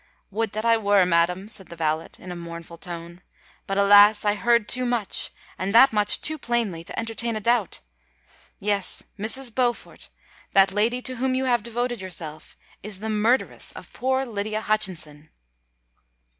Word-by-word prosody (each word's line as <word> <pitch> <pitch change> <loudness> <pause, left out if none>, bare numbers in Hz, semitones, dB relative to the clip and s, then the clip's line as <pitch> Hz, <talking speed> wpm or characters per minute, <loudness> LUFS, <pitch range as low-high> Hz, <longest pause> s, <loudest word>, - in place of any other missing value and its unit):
"Would 220 +1 -2
that 215 +2 -3
I 230 0 +5
were, 205 -3 +3
madam," 180 +3 +1
said 195 -4 -6
the 170 - -10
valet, 160 -1 -1
in 180 - -9
a - - -5
mournful 170 0 -9
tone; 170 0 -7 0.5
"but, 195 - -2
alas! 205 +1 +6
I 205 - +3
heard 235 +1 +2
too 255 - +1
much—and 220 -4 -3
that 265 +1 +8
much 210 -1 +2
too 310 0 -2
plainly—to 220 -10 -2
entertain 230 0 -2
a - - -2
doubt! 230 -2 +1 0.8
Yes, 200 -2 +1 0.2
Mrs. 235 +3 -3
Beaufort—that 230 -5 -1
lady 230 +5 0
to 255 -1 -1
whom 260 +1 0
you 260 +1 0
have 240 -3 +2
devoted 240 0 -3
yourself, 165 -4 -7 0.2
is 210 -1 -7
the 220 +3 -4
murderess 220 +5 +1
of - - -12
poor 260 +1 0
Lydia 215 -2 -3
Hutchinson!" 175 -9 -1
210 Hz, 155 wpm, -24 LUFS, 185-235 Hz, 0.8 s, that